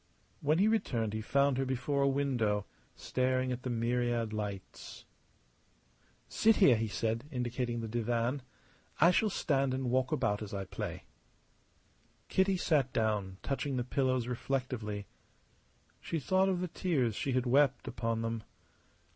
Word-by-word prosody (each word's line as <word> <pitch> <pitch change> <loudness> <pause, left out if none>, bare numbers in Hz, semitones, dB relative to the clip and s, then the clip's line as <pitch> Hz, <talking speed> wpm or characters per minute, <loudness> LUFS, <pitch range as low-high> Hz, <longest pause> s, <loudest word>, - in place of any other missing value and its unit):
When 150 +2 +2
he 200 +4 +4
returned 120 - 0
he 110 - -2
found 140 +3 +2
her - - +2
before 130 +2 -1
a 140 - +4
window, 125 -7 +1 0.3
staring 130 0 0
at 125 0 -3
the 130 - -4
myriad 120 -1 0
lights. 100 -3 -6 1.2
"Sit 220 0 +4
here," 140 - +6
he 110 0 -1
said, 115 +4 -2
indicating 120 -2 -2
the 115 - -4
divan. 120 +3 -1 0.6
"I 170 - +7
shall 215 +4 +2
stand 135 -7 +1
and 130 -2 -2
walk 130 +2 +1
about 105 -9 0
as 105 -1 -5
I 100 -1 -3
play." - - -5 1.3
Kitty 190 0 +2
sat 145 -7 +2
down, 105 -4 -1
touching 135 -1 -2
the 125 - 0
pillows, 130 -1 0
reflectively. 125 -5 -3 0.9
She 165 - -3
thought 190 +6 +2
of 180 -2 0
the 180 - -1
tears 145 - 0
she 135 - -1
had 130 0 +1
wept 135 +1 +3
upon 115 -1 -2
them. 115 0 -2
125 Hz, 145 wpm, -32 LUFS, 115-140 Hz, 1.3 s, I